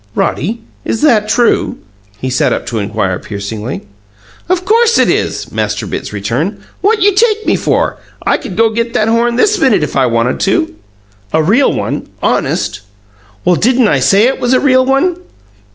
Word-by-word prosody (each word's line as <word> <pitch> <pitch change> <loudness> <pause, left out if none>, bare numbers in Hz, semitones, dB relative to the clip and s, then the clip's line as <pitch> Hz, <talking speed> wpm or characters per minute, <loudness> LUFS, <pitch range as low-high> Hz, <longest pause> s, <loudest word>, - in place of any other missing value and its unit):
"Roddy, 220 - -1 0.2
is 225 - -2
that 220 -8 +3
true?" 240 +1 +1 0.4
he 130 +4 -4
sat 130 - +1
up - - -2
to 115 - -3
inquire 100 -3 -2
piercingly. 105 +4 -5 0.7
"Of 365 0 0
course 460 +3 +3
it - - +3
is!" - - -2
Master - - -2
Bitts - - -5
returned. - - -2 0.2
"What 420 0 +2
you 410 0 +4
take 435 +1 +2
me - - +2
for? - - 0 0.3
I - - +2
could 185 - -8
go 225 0 +3
get 230 +1 -2
that 215 +1 +2
horn 235 +1 +2
this 410 - +2
minute 215 - +3
if 150 - -4
I 130 -2 +3
wanted 115 +1 0
to." 190 - 0 0.6
"A 160 - +3
real 230 - +3
one - - -3
honest?" - - -1 0.6
"Well, 180 0 +4
didn't 245 +3 +2
I 135 - +2
say 195 +11 +4
it 265 - 0
was 245 +1 +1
a 255 - +4
real 260 -2 +3
one?" 290 +7 +2
230 Hz, 180 wpm, -13 LUFS, -, 0.7 s, you